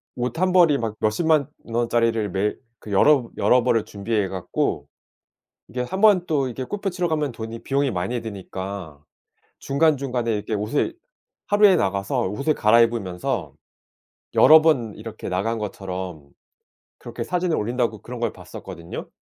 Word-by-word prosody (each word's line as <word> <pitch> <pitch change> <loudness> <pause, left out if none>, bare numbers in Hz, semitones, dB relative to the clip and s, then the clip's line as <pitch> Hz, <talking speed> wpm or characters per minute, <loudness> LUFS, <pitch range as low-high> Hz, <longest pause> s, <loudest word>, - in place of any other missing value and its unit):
옷 125 +6 -3
1 185 0 +2
벌이 170 -6 +5
막 110 -2 -3
몇 110 - +2
100,000 165 +9 -2
만 155 -3 +3 0.2
원짜리를 115 -2 0
매일 100 +3 -1 0.2
그 105 - -10
여러브 125 +4 +4
여러 125 -1 +4
벌을 115 -2 +2
준비해 105 0 -2
갖고 90 -1 -2 0.8
이게 125 - -5
한번 190 +4 +3
또 140 -4 0
이게 130 +2 -5
골프 200 +5 -3
치러 175 -1 -1
가면 150 -4 -1
돈이 115 0 -7
비용이 140 0 0
많이 100 +6 -2
드니까 95 -6 -7 0.6
중간중간에 135 -5 +1
이렇게 105 +1 -3
옷을 110 - -1 0.5
하루에 205 -2 +5
나가서 100 0 0
옷을 140 +9 0
갈아입으면서 110 -5 +1 0.8
여러 155 0 +8
번 125 -9 +2
이렇게 110 -2 -7
나간 105 +5 -1
것처럼 95 -7 -6 0.7
"그렇게 - - -6
사진을 180 -2 0
올린다."고 115 -1 -1
그런 125 -1 -8
걸 115 -2 0
봤었거든요. 85 +1 -9
115 Hz, 315 characters per minute, -23 LUFS, 100-145 Hz, 0.8 s, 여러